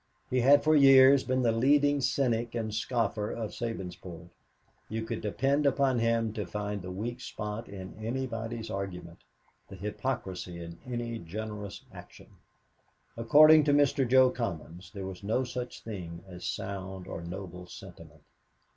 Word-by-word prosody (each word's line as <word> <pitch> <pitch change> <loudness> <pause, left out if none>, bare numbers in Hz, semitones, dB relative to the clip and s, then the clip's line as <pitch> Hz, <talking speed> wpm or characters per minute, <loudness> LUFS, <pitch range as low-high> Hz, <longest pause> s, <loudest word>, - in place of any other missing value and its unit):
He 130 - +2
had 140 +3 +6
for 155 0 +4
years 135 -1 +7
been 130 0 0
the 115 - +3
leading 145 +4 +3
cynic 120 -2 0
and 110 -2 -3
scoffer 110 -2 -1
of 110 -3 -4
Sabinsport. 90 -6 -6 0.6
You 110 +1 -3
could 115 0 -4
depend 135 +7 +1
upon 135 -2 +2
him 115 -1 +1
to 105 -5 -4
find 105 +1 -4
the 90 - -7
weak 115 +7 -4
spot 105 0 -6
in 95 -2 -8
anybody's 115 -2 -4
argument, 90 -4 -6 0.5
the - - -10
hypocrisy 95 -3 -4
in 85 0 -9
any 120 -2 -4
generous 105 +2 -7
action. - - -13 0.9
According 150 +7 +7
to 145 - +3
Mr. 140 -2 +3
Jo 130 0 +6
Commons 90 -6 -5
there 100 -2 -6
was 95 -1 -7
no 110 +6 +1
such 125 0 -6
thing 90 -6 -7
as 90 -2 -9
sound 95 -1 -5
or 85 - -6
noble 90 0 -7
sentiment. 85 -6 -13
110 Hz, 145 wpm, -29 LUFS, 95-125 Hz, 0.9 s, years